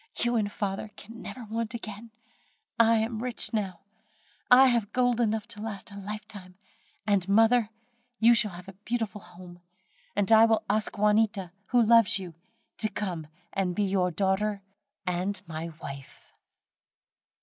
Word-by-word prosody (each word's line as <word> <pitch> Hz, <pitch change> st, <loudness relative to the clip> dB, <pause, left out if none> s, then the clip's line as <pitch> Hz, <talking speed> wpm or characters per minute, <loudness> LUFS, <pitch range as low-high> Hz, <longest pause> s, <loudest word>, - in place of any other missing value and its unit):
you 240 Hz, 0 st, +2 dB
and 210 Hz, -3 st, 0 dB
father 200 Hz, +1 st, -3 dB
can 230 Hz, +3 st, -11 dB
never 255 Hz, -, -7 dB
want 225 Hz, +1 st, -4 dB
again, 220 Hz, 0 st, -7 dB, 0.7 s
I 230 Hz, 0 st, +6 dB
am 220 Hz, 0 st, -1 dB
rich 245 Hz, -1 st, 0 dB
now. 195 Hz, -6 st, -2 dB, 0.7 s
I 255 Hz, +2 st, +8 dB
have 235 Hz, -5 st, +2 dB
gold 245 Hz, -1 st, +2 dB
enough 220 Hz, -2 st, 0 dB
to 210 Hz, -, -9 dB
last 210 Hz, -3 st, -6 dB
a -, -, -10 dB
lifetime; 200 Hz, -2 st, -8 dB, 0.5 s
and, 200 Hz, -3 st, +1 dB
mother, 225 Hz, +2 st, +4 dB, 0.5 s
you 230 Hz, +1 st, +6 dB
shall 215 Hz, -4 st, +2 dB
have 180 Hz, +1 st, -10 dB
a 195 Hz, -, -9 dB
beautiful 210 Hz, 0 st, -4 dB
home: 175 Hz, 0 st, -13 dB, 0.5 s
and 205 Hz, 0 st, 0 dB
I 220 Hz, 0 st, +8 dB
will 225 Hz, -1 st, +2 dB
ask 215 Hz, +1 st, 0 dB
Juanita, 210 Hz, -3 st, +2 dB, 0.2 s
who 245 Hz, -2 st, +4 dB
loves 230 Hz, -3 st, +5 dB
you, 185 Hz, -3 st, -7 dB, 0.5 s
to 215 Hz, -, 0 dB
come 175 Hz, -8 st, -4 dB, 0.3 s
and 185 Hz, -2 st, -1 dB
be 210 Hz, -, +1 dB
your 190 Hz, -2 st, +1 dB
daughter 195 Hz, +3 st, 0 dB, 0.4 s
and 180 Hz, +3 st, -1 dB
my 165 Hz, 0 st, -5 dB
wife." 140 Hz, -1 st, -9 dB
210 Hz, 150 wpm, -28 LUFS, 190-225 Hz, 0.7 s, I